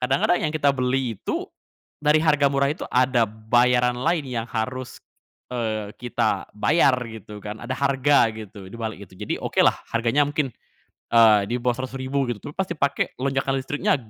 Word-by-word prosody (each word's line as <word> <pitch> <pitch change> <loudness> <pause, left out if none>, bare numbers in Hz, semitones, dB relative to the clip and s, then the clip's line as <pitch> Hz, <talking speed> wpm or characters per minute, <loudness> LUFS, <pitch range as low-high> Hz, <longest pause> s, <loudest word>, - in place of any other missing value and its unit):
kadang-kadang 135 +7 +2
yang - - -5
kita 140 -2 +3
beli 125 -3 -1
itu, - - -2 0.6
dari 150 +1 +4
harga 145 -3 +4
murah 140 +1 +1
itu, - - -7
ada 125 -3 +2
bayaran 120 +3 +2
lain 160 +1 +1
yang 120 -3 -4
harus, 125 +3 -4 0.5
eee, 110 -3 -3
kita 120 -2 -1
bayar, 140 +2 +3 0.2
gitu 105 -1 -10
kan. 105 +1 -6
Ada 130 - -4
harga, 140 -3 +3
gitu, 105 -3 -10
di - - -8
balik 110 -2 -5
itu. - - -25
Jadi, - - -3
okelah, - - +3 0.2
harganya 115 +5 +2
mungkin, 145 -1 -1 0.7
eee, 110 -3 +7
di 120 - +1
bawah 125 0 -1
Rp.100.000 130 +1 -2
gitu. 115 - -3
Tapi - - -16
pas 190 -1 -1
dipake, 140 -4 -1
lonjakan 135 0 0
listriknya 140 +3 0
125 Hz, 165 wpm, -23 LUFS, 115-140 Hz, 0.7 s, eee